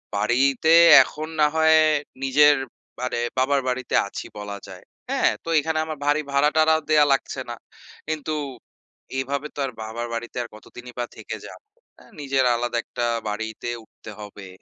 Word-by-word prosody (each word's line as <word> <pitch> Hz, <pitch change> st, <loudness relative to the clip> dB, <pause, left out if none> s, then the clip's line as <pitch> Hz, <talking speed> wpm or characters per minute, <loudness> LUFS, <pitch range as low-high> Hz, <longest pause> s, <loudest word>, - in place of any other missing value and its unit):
বাড়ি 115 Hz, +5 st, +1 dB, 0.2 s
তে 160 Hz, -, +6 dB, 0.3 s
এখন 155 Hz, +1 st, -7 dB
না 150 Hz, -, +6 dB
হয় 160 Hz, 0 st, +5 dB, 0.5 s
নিজের 145 Hz, +2 st, +5 dB, 0.5 s
মানে 125 Hz, -1 st, -2 dB, 0.2 s
বাবার 135 Hz, +1 st, +2 dB
বাড়িতে 125 Hz, 0 st, -2 dB
আছি -, -, -7 dB
বলা 100 Hz, 0 st, -6 dB
যায়। -, -, -11 dB, 0.3 s
হ্যাঁ? -, -, +2 dB
তো 165 Hz, -, -7 dB
এখানে 160 Hz, +1 st, -2 dB
আমার 155 Hz, -1 st, -6 dB
বাড়ি 145 Hz, +1 st, +2 dB
ভাড়া-টাড়া 155 Hz, +3 st, +3 dB
দেওয়া 150 Hz, -1 st, +5 dB
লাগছে 135 Hz, -, -2 dB
না। -, -, -4 dB, 0.5 s
কিন্তু 155 Hz, 0 st, -3 dB, 0.9 s
এভাবে 140 Hz, +2 st, -3 dB
তো -, -, -8 dB
আর 130 Hz, -, -5 dB
বাবার 115 Hz, +2 st, -5 dB
বাড়িতে 120 Hz, +2 st, -5 dB
আর -, -, -8 dB
কতদিনই 120 Hz, +3 st, -12 dB
বা 120 Hz, -, 0 dB
থেকে -, -, -6 dB
যাব? -, -, -11 dB, 0.4 s
হ্যাঁ? -, -, -19 dB
নিজের 135 Hz, -1 st, +1 dB
আলাদা 120 Hz, 0 st, -2 dB
একটা 120 Hz, -1 st, -4 dB, 0.2 s
বাড়িতে 110 Hz, +2 st, -5 dB, 0.2 s
উঠতে 110 Hz, -, -13 dB
হবে। 105 Hz, -1 st, -10 dB
135 Hz, 160 wpm, -23 LUFS, 120-150 Hz, 0.9 s, তে